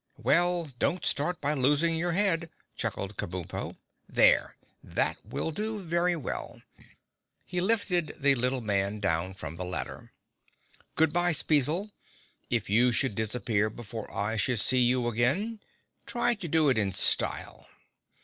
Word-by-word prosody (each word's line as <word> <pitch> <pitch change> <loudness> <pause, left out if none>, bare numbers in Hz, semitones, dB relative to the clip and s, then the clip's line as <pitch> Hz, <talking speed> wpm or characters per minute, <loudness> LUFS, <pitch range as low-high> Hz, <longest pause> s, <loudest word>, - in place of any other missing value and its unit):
"Well, 175 0 +2
don't 180 - 0
start 160 +4 0
by 145 +1 +1
losing 150 +4 +2
your 170 +1 -1
head," 175 -3 +1 0.3
chuckled 100 +1 -4
Kabumpo. 90 -1 -4 0.3
"There—that - - +1
will 160 - -3
do 215 +5 -3
very 175 0 0
well." 150 -7 -6 0.8
He 180 -1 -2
lifted 185 -5 +1
the 140 -1 +4
little 125 0 0
man 100 -1 -1
down 95 -1 -1
from 80 -3 -7
the 90 - -3
ladder. 90 +1 -6 0.8
"Good 160 -1 +2
bye, 175 0 +3
Spezzle. 155 +7 +2 0.6
If 120 -3 -1
you 120 +5 +4
should 120 0 0
disappear 110 0 -1
before 110 -1 -8
I 105 +3 -2
should 115 +2 +1
see 130 +4 +2
you 125 0 +2
again, 140 - 0 0.5
try 240 -1 +1
to 200 -6 -6
do 160 -1 +2
it 125 -4 +2
in 100 -2 -1
style." 95 - +2
140 Hz, 140 wpm, -28 LUFS, 110-175 Hz, 0.8 s, the